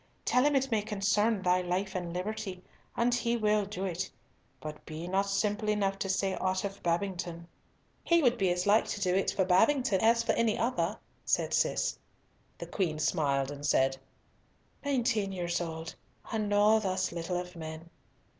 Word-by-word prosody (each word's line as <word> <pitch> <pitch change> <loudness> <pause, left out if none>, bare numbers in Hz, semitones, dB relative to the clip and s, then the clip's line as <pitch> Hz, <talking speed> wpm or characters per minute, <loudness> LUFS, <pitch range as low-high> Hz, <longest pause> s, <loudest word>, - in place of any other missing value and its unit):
Tell 250 - +3
him 290 0 +3
it 270 -1 +1
may 220 -2 +2
concern 205 0 +1
thy 180 0 +3
life 185 +2 -2
and 175 -3 -3
liberty, 185 0 -4 0.3
and 240 +1 +2
he 235 0 +1
will 210 -2 +2
do 195 -1 -4
it, 180 -1 -3 0.5
but 150 +3 -8
be 160 +2 -7
not 195 +2 0
simple 210 +2 0
enough 195 -2 0
to 195 - -2
say 190 0 +1
ought 185 +1 0
of 200 0 -5
Babington." 175 -1 -2 0.6
"He 340 -1 +3
would 245 -2 +4
be 190 -2 +1
as 180 0 0
like 210 +2 +4
to - - -3
do 185 -2 +1
it 195 +1 +2
for 190 - +1
Babington 220 +3 +3
as 230 +1 +4
for 230 - +1
any 230 -2 +1
other," 215 -5 0 0.3
said - - 0
Cis. - - +1 0.6
The - - -6
Queen 170 -6 -1
smiled 140 -3 +1
and 145 0 -8
said, 135 -2 +3 0.9
"Nineteen 240 -7 +1
years 175 -2 -2
old, 160 -1 -5 0.4
and 215 -2 -1
know 210 +2 +5
thus 190 -2 -1
little 170 +1 -2
of 180 0 -8
men." 160 0 -7
195 Hz, 175 wpm, -30 LUFS, 175-215 Hz, 0.9 s, know